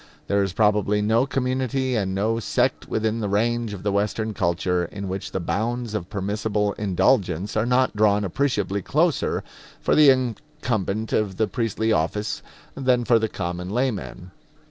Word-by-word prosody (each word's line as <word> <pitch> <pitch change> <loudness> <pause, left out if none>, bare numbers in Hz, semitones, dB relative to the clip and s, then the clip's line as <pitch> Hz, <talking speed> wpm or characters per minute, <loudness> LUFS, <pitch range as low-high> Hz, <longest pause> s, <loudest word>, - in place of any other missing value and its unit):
There 100 0 +1
is 95 -2 -1
probably 105 -1 +2
no 115 +5 +2
community 130 -1 -1
and 95 -3 -1
no 110 +4 0
sect 115 - 0
within 110 +1 0
the 105 -2 -2
range 115 +2 0
of 100 -2 -7
the 100 - +1
Western 105 +2 -1
culture 90 -1 0
in 100 +3 -6
which 95 +1 -4
the - - -2
bounds 110 +7 -2
of 95 -4 -4
permissible 105 +1 -1
indulgence 100 -1 +1
are 110 +2 +1
not 125 0 +2
drawn 105 -1 +3
appreciably 100 -2 0
closer 155 - +1 0.4
for - - +1
the 150 -2 +7
incumbent 125 -5 -1
of 100 -4 0
the 110 - +2
priestly 110 +1 0
office 105 0 -1 0.3
than 130 -3 +1
for 115 -1 +4
the 110 0 -1
common 90 -1 -4
layman. 105 -6 -2
105 Hz, 160 wpm, -24 LUFS, 100-120 Hz, 0.4 s, the